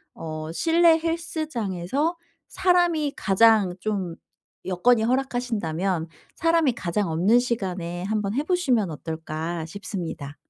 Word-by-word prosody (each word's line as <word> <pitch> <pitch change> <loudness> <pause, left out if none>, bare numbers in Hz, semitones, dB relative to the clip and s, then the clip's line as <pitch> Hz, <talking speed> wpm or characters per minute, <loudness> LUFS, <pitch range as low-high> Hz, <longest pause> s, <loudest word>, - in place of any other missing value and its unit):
어 155 -1 -6
실내 330 - +4
헬스장에서 310 - -2 0.3
사람이 345 -5 +2
가장 210 -2 +4
좀 190 -4 -2 0.5
여건이 220 +6 +3
허락하신다면 220 -9 -1 0.3
'사람이 330 -5 +2
가장 190 -2 -2
없는 190 +9 +4
시간에 185 -8 -3
한번 210 +1 -1
해 285 - +1
보시면 265 - +1
어떨까.' 160 +1 -4
싶습니다. 165 -6 -6
210 Hz, 265 characters per minute, -24 LUFS, 175-280 Hz, 0.5 s, 실내